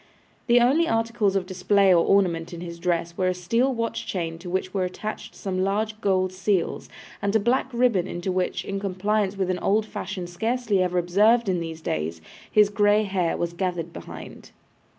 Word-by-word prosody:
The 240 0 +6
only 280 +8 +3
articles 225 -3 +1
of 190 -2 0
display 190 +1 +3
or 170 -1 +5
ornament 175 -4 +1
in 170 - -8
his 170 -1 -7
dress 170 -1 -1
were 185 0 0
a 185 - +1
steel 230 +9 +1
watch 230 -2 -3
chain 165 -3 -3
to 175 +1 -8
which 185 +1 -2
were 195 -2 0
attached 195 +4 -5
some 185 -2 -3
large 215 +2 -1
gold 185 -2 +1
seals; 190 -1 -1 0.3
and 200 +1 0
a - - +6
black 245 +4 +1
ribbon 235 -7 +2
into 175 +1 -3
which, 185 0 -1
in 195 0 -3
compliance 200 +1 -1
with 190 -1 0
an 180 - -2
old 215 +2 +2
fashion 190 -3 -5
scarcely 220 +3 0
ever 180 0 0
observed 210 +7 +3
in 185 -2 +1
these 165 -1 -6
days, 80 - -3 0.3
his 210 -1 +5
grey 205 0 +3
hair 190 -4 -1
was 170 0 -2
gathered 175 -2 -3
behind. - - -10
190 Hz, 190 wpm, -25 LUFS, 180-215 Hz, 0.3 s, The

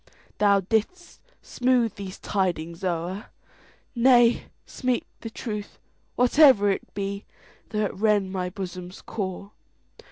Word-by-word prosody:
Thou 200 -1 +4
'dst 225 - -2 0.2
smooth 245 -4 +1
these 195 -1 -8
tidings 170 -3 -2
o'er,—Nay, 230 +7 0 0.2
speak 255 -2 -2
the 225 - -6
truth, 210 -3 -6 0.4
whatever 250 -5 +6
it 195 - -4
be, 200 0 -4 0.4
Though 215 -1 0
it - - -3
rend 205 -2 +1
my 180 -1 -2
bosom's 180 -1 -7
core. 195 -1 -5
205 Hz, 105 wpm, -25 LUFS, 190-235 Hz, 0.4 s, whatever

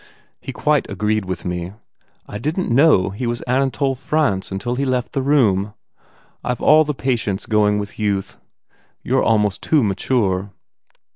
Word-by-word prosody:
He - - -7
quite - - 0
agreed 105 -1 -1
with 90 0 -5
me. 90 +1 -4 0.5
I 105 - -7
didn 155 - -1
t - - +1
know 130 - +4
he 120 +5 -4
was 120 0 -2
Anatole 135 +2 0
France 135 -8 -1
until 95 +6 -3
he 135 +3 -1
left 130 -2 -1
the 135 - 0
room. 105 -8 +2 0.7
I 125 - -1
ve - - -12
all 155 +1 +6
the 150 -1 -3
patience 115 -7 -2
going 105 -1 +2
with 105 +1 -6
youth. 100 -2 -2 0.7
You - - +1
re - - +1
almost 105 -3 +1
too 155 -5 +2
mature." 100 -2 0
110 Hz, 165 wpm, -20 LUFS, 100-135 Hz, 0.7 s, all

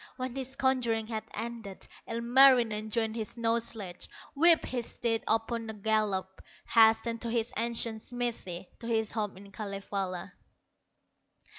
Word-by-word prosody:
When 255 -1 -4
his 265 0 -1
conjuring 240 -4 +1
had 220 -1 -4
ended, 225 -3 -6 0.2
Ilmarinen 235 -2 +4
joined 220 0 0
his 220 -3 -2
snow 230 -1 +1
sledge, 200 -6 -4 0.2
Whipped 330 +3 +5
his 245 -2 -3
steed 225 -2 -1
upon 225 0 0
a 220 - -5
gallop, 200 -3 0 0.3
Hastened 225 0 +4
to 235 - -2
his 230 0 0
ancient 230 -1 0
smithy, 230 -8 -4
To 230 - -7
his 220 -2 +1
home 210 -4 -3
in 200 +1 -13
Kalevala. 195 -2 -4
225 Hz, 135 wpm, -30 LUFS, 210-235 Hz, 0.3 s, Whipped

